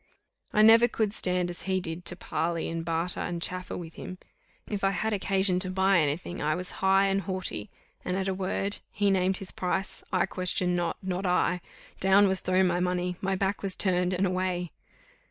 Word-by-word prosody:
I 215 - +4
never 225 +2 +8
could 215 -4 0
stand 180 -3 +2
as 175 - -4
he 190 0 +2
did 175 0 -5
to - - +1
parley, 170 0 -2
and 165 0 -3
barter, 165 +2 -1
and 175 -1 -3
chaffer 185 +2 -2
with 165 -2 -8
him 185 - -8 0.5
if 205 -2 -4
I 195 - +4
had 205 +4 -1
occasion 195 -2 +2
to 185 0 +1
buy 190 0 +3
any 150 -1 +1
thing, 175 0 -8
I 155 +1 +1
was 180 0 -3
high 195 +1 +4
and 195 0 +1
haughty, 190 +2 -4 0.3
and 180 - -2
at 195 0 -1
a 190 - 0
word; 195 +1 -2
he 205 -1 +1
named 190 0 +2
his 195 - -6
price, 190 +1 -2
I 185 -2 +2
questioned 180 -1 0
not, 175 -1 -1
not 185 0 -2
I 180 0 +1 0.4
down 195 +2 +5
was 190 -1 +1
thrown 185 +1 +2
my 175 -1 +1
money, 180 0 -1
my 195 0 0
back 195 +1 -1
was 195 -2 -1
turned 180 -1 +2
and 185 +2 +1
away! 185 -2 -1
185 Hz, 205 wpm, -28 LUFS, 180-195 Hz, 0.5 s, never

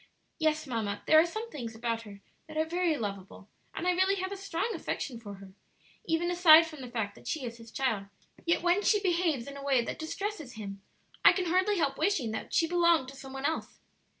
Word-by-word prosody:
"Yes, 310 -1 +1
mamma, 220 -6 -3
there 315 - +7
are 330 - +4
some 440 +6 -6
things 235 -6 -6
about 230 0 -2
her 200 -1 -12 0.3
that 310 0 -8
are 315 - +2
very 340 -1 0
lovable, 200 -2 -6 0.3
and 360 - -2
I - - +5
really 375 +2 +2
have 375 0 -3
a - - -3
strong 390 +2 -2
affection 275 - -4
for 205 -3 -8
her, 195 -1 -13 0.5
even 340 0 0
aside 335 -2 +8
from 310 -4 -9
the 250 - -7
fact 220 -4 -3
that - - -15
she 300 -5 -2
is 235 -1 -6
his 230 -1 -13
child; 225 -7 -1 0.4
yet 335 0 +1
when 355 +3 +3
she 420 0 +3
behaves 340 -9 +1
in 280 0 -8
a 280 - -8
way 270 -4 +3
that - - -5
distresses 320 - -4
him 200 -3 -7 0.4
I - - +9
can 370 - -1
hardly 375 +4 +2
help 275 -5 0
wishing 315 - +1
that 220 - -5
she 330 - +3
belonged 340 -5 +3
to 275 - -11
some 270 0 -10
one 270 +1 -4
else. 320 +2 -2
310 Hz, 225 wpm, -30 LUFS, 235-350 Hz, 0.5 s, I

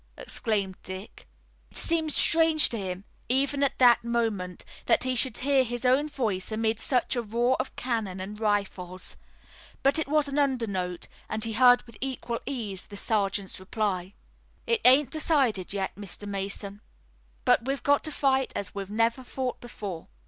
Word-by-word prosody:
exclaimed 200 -5 -2
Dick. 190 +2 -9 0.4
It - - -9
seemed 320 -2 0
strange 320 0 +5
to 230 - -4
him, 185 -1 -4 0.3
even 275 +2 +1
at 280 - +1
that 240 -3 +6
moment, 225 -6 -2 0.2
that - - +4
he 255 0 0
should 255 +1 +1
hear 270 0 +3
his 240 0 -4
own 270 +4 +3
voice 220 -9 -2
amid 220 0 0
such 250 +2 +1
a 240 - 0
roar 235 +3 +1
of - - -3
cannon 220 -7 -2
and 205 +3 -6
rifles. 195 -4 -2 0.7
But 275 +4 +4
it 320 - -2
was 300 0 +2
an 280 +1 -1
undernote, 200 -11 -1 0.2
and 215 0 -2
he 225 - -1
heard 245 +2 +6
with 230 -3 -16
equal 255 -3 -3
ease 215 -9 -4
the 205 - -9
sergeant's 200 -3 -1
reply: 190 -1 -2 0.5
"It 465 -1 +1
ain't 260 +1 +6
decided 275 - +1
yet, 195 -1 -2
Mr. 205 0 -8
Mason, 200 +1 -4 0.6
but 230 - +4
we've 275 0 -2
got 285 0 +3
to 310 - +1
fight 265 -2 +1
as 200 - -4
we 200 - -3
never 230 +4 +1
fought 255 0 -4
before." 200 -8 -7
230 Hz, 165 wpm, -27 LUFS, 200-265 Hz, 0.7 s, that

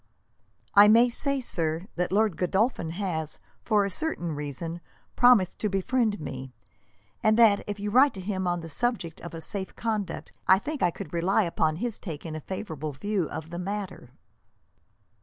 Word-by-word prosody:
"I 205 +1 +9
may 230 +3 +6
say, 275 +3 -1
sir, 165 -8 -1
that 180 0 -1
Lord 210 -2 +2
Godolphin 190 0 0
has, 165 -4 -3 0.2
for 210 -3 +2
a 200 - -3
certain 185 - -2
reason, 150 +3 -5 0.3
promised 245 -7 +5
to 210 - 0
befriend 210 +2 0
me; 130 -4 -7 0.7
and 215 0 +3
that, 220 -4 +5
if 205 0 -4
you 205 +1 -3
write 265 +3 +5
to - - -6
him 190 -1 -2
on 175 -1 0
the 165 - -7
subject 190 -3 -2
of 170 -1 -8
a - - -5
safe 190 +2 -4
conduct, 215 -4 -3
I 190 - +7
think 295 +8 -5
I 175 - +4
could 160 -1 -8
rely 185 +5 +2
upon 160 -3 0
his 230 +5 -3
taking 160 -3 -6
a 155 - -5
favourable 155 -5 -5
view 190 +4 -2
of 160 +1 -7
the 175 - -5
matter." 190 -7 -5
190 Hz, 175 wpm, -27 LUFS, 165-215 Hz, 0.7 s, I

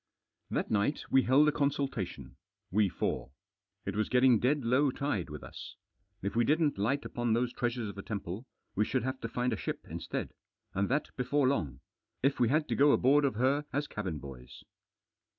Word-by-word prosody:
That - - -1
night 110 +7 +1
we 135 - +6
held 135 +5 +5
a - - +5
consultation. 140 -8 -2 0.4
We 105 +1 +3
four. 65 - -3 0.5
It - - -3
was 110 0 0
getting 125 -2 +5
dead 135 +1 +1
low 130 +4 +4
tide 125 - -2
with 75 -1 -7
us. - - -9 0.5
If 100 - -2
we 120 - +4
didn't 150 -3 +2
light 135 +8 0
upon 120 -2 -1
those 120 +1 +1
treasures 120 -2 -1
of 100 - -5
the 100 - -7
temple, 100 +3 -5 0.3
we 105 - +2
should 130 +2 0
have 130 +1 -3
to 115 - -2
find 125 +1 0
a - - -2
ship - - -4
instead. - - -4 0.4
And 100 +1 0
that 145 +4 -1
before 130 +2 +2
long. 80 - -1 0.4
If 135 +1 +2
we 120 - +4
had 150 +3 +2
to - - +1
go 145 +1 +5
aboard 140 +3 +4
of 135 - 0
her 135 +5 +2
as 145 +2 0
cabin 95 - -4
boys. 65 -3 -10
125 Hz, 190 wpm, -31 LUFS, 105-140 Hz, 0.5 s, we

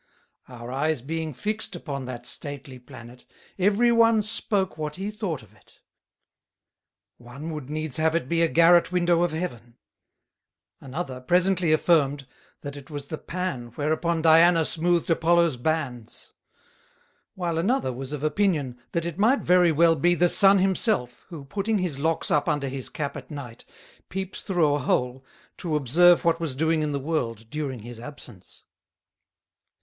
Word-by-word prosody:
Our 120 -1 -9
Eyes 140 -1 -1
being 160 +2 -3
fixed 210 - -3
upon 140 -6 -6
that 120 -1 -7
stately 135 +1 -5
Planet, 120 0 -13 0.4
every 210 +5 +3
one 230 -2 +4
spoke 205 -3 -1
what 150 -1 -5
he 195 +4 -4
thought 195 - -4
of - - -20
it: - - -25 1.5
One 130 +7 -8
would 150 -4 -7
needs 155 -3 -3
have 160 +1 +1
it 170 -6 -1
be 170 +3 0
a 165 - +4
Garret 170 +2 +4
Window 175 -1 +2
of 175 -2 +1
Heaven; 120 -8 -6 1.0
another 135 -2 -6
presently 180 +3 +2
affirmed, 145 -4 +2 0.4
That 145 0 -7
it 140 -2 -12
was 145 -2 -7
the 155 - -5
Pan 135 -10 -5
whereupon 160 +2 -1
Diana 165 0 +5
smoothed 170 +1 +1
Apollo's 170 -2 +3
Bands; 125 -4 -4 1.0
whilst 170 -3 -2
another 195 - 0
was 130 +2 -7
of 150 -1 -5
Opinion, 150 -6 0
That 170 -1 -1
it 170 +1 -5
might 235 +7 +3
very 180 -1 +4
well 165 +1 +4
be 175 +4 +2
the 175 +1 +3
Sun 195 +2 +6
himself, 190 - 0
who 160 -6 -9
putting 205 +8 -1
his 175 -7 -2
Locks 160 +2 -1
up 150 +3 +2
under 145 -3 -1
his 130 -1 -3
Cap 145 -2 -4
at 135 -3 -9
Night, 135 -6 -9 0.4
peeped 190 +1 -5
through 170 -6 +1
a 145 - 0
hole 125 0 -1 0.3
to 165 -4 -3
observe 165 +6 +4
what 165 0 +2
was 160 -6 -3
doing 160 +2 +1
in 150 -1 -1
the 140 - -2
World 115 -7 -3
during 140 -6 -4
his 120 +1 -9
absence. 120 -7 -12
155 Hz, 160 wpm, -25 LUFS, 135-175 Hz, 1.5 s, Sun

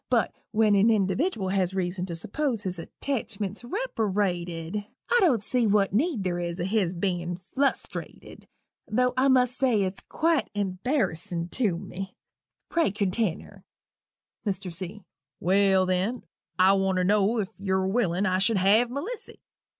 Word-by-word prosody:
But - - +2 0.2
when 215 -1 +3
an 200 +2 +5
individdiwal 205 - +1
has 190 -1 +1
reason 180 0 -2
to 170 - -4
suppose 225 - -2
his 185 -2 -3
attachment's 210 -1 -4
reperated, 205 - -2 0.2
I 485 - +6
don't 265 - +3
see 245 +1 +1
what 200 -1 +2
need 255 - +1
there 175 -2 -1
is 170 0 -3
o' - - -1
his 190 -2 0
bein' 175 -1 -2
flustrated 275 +1 -3 0.4
tho' 250 +3 +2
I 260 +1 +3
must 250 -2 +4
say 245 -7 +2
it's 185 0 -3
quite 325 -3 0
embarrassin' 185 - -1
to 205 -5 0
me 190 +1 -7 0.5
pray 335 -7 +2
continner." 200 -1 -2 0.8
MR. 195 -3 -3
C. 185 +4 -6 0.4
"Well, 190 +1 +3
then, 185 +6 -1 0.3
I 190 +1 +6
want 195 -1 +1
to 185 - +2
know 205 +4 +3
if 200 -3 -1
yu're 190 -1 0
willing 190 -2 +1
I 185 -1 +2
should 195 +3 +2
have 210 +6 +4
Melissy?" 350 - -6
200 Hz, 145 wpm, -27 LUFS, 185-230 Hz, 0.8 s, I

